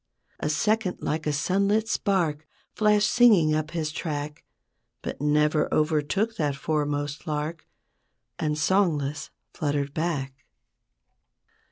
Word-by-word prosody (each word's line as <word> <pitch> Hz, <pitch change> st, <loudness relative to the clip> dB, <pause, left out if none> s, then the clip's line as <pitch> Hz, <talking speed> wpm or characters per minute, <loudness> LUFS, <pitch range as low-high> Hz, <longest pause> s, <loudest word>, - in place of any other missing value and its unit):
A 150 Hz, -, -1 dB
second 210 Hz, +5 st, +1 dB
like 155 Hz, 0 st, -2 dB
a -, -, +2 dB
sunlit 200 Hz, +8 st, +1 dB
spark 165 Hz, -9 st, 0 dB, 0.3 s
Flashed 210 Hz, -1 st, +3 dB
singing 205 Hz, -11 st, +5 dB
up 155 Hz, 0 st, -1 dB
his 160 Hz, -2 st, -2 dB
track; 150 Hz, -2 st, -4 dB, 0.6 s
But -, -, -5 dB
never 150 Hz, +1 st, +2 dB
overtook 155 Hz, +9 st, +1 dB
that 145 Hz, -4 st, 0 dB
foremost 145 Hz, +1 st, -2 dB
lark, 155 Hz, +2 st, -3 dB, 0.7 s
And 150 Hz, -1 st, -1 dB
songless 155 Hz, -4 st, +1 dB, 0.2 s
fluttered 145 Hz, -2 st, -2 dB
back. 140 Hz, -5 st, -3 dB
155 Hz, 110 wpm, -26 LUFS, 150-185 Hz, 0.7 s, singing